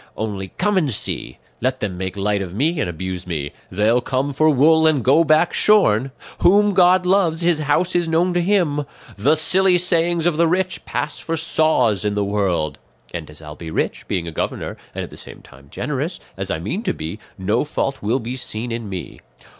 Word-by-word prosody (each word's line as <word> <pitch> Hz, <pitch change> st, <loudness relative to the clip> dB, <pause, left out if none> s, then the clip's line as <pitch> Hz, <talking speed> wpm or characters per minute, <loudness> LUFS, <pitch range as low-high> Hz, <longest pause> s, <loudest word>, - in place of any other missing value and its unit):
Only 100 Hz, -3 st, -3 dB
come 205 Hz, 0 st, +2 dB
and 150 Hz, -6 st, 0 dB
see! 105 Hz, -, -3 dB, 0.2 s
Let 130 Hz, +2 st, 0 dB
them 100 Hz, -4 st, -3 dB
make 95 Hz, +2 st, -5 dB
light 100 Hz, 0 st, 0 dB
of 95 Hz, -1 st, -6 dB
me 155 Hz, +8 st, +1 dB
and 130 Hz, -, -1 dB
abuse 90 Hz, +2 st, -5 dB
me; 75 Hz, -5 st, -3 dB, 0.2 s
'they'll 110 Hz, +5 st, +2 dB
come 135 Hz, +3 st, -1 dB
for 155 Hz, +3 st, +3 dB
wool 160 Hz, +3 st, +5 dB
and 150 Hz, -6 st, +2 dB
go 140 Hz, +7 st, +5 dB
back 155 Hz, +2 st, +3 dB
shorn;' 135 Hz, -, +3 dB, 0.3 s
'whom 205 Hz, +3 st, +4 dB
God 180 Hz, 0 st, +5 dB
loves, 180 Hz, -3 st, +2 dB
his 170 Hz, -2 st, +2 dB
house 155 Hz, +5 st, +1 dB
is 175 Hz, -1 st, +2 dB
known 170 Hz, +3 st, +2 dB
to 175 Hz, -, +1 dB
Him;' 170 Hz, -6 st, +1 dB, 0.3 s
'the 135 Hz, +10 st, +3 dB
silly 185 Hz, +3 st, +3 dB
sayings 170 Hz, -1 st, +1 dB
of 175 Hz, -3 st, +2 dB
the 170 Hz, 0 st, +4 dB
rich 185 Hz, +2 st, -1 dB
pass -, -, -3 dB
for 165 Hz, 0 st, -3 dB
saws 150 Hz, -, +2 dB
in 105 Hz, -1 st, -1 dB
the 105 Hz, -1 st, 0 dB
world;' 90 Hz, -8 st, -1 dB, 0.3 s
and 85 Hz, -3 st, -6 dB
as 75 Hz, +1 st, -13 dB
I'll 75 Hz, 0 st, -8 dB
be 80 Hz, 0 st, -8 dB
rich, -, -, -2 dB
being 85 Hz, -2 st, -2 dB
a -, -, -4 dB
governor, -, -, -3 dB, 0.2 s
and -, -, -3 dB
at -, -, -9 dB
the -, -, -12 dB
same -, -, -12 dB
time 70 Hz, 0 st, -17 dB
generous, 150 Hz, -, -3 dB, 0.2 s
as 95 Hz, 0 st, -4 dB
I 85 Hz, -, -1 dB
mean 105 Hz, -, -3 dB
to -, -, -1 dB
be, 80 Hz, +7 st, -6 dB, 0.2 s
no 105 Hz, +5 st, 0 dB
fault 140 Hz, -2 st, -3 dB
will 110 Hz, +5 st, +1 dB
be 120 Hz, +1 st, -5 dB
seen 120 Hz, -2 st, -4 dB
in 115 Hz, -2 st, -4 dB
me. 95 Hz, -3 st, -7 dB
135 Hz, 210 wpm, -20 LUFS, -, 0.3 s, wool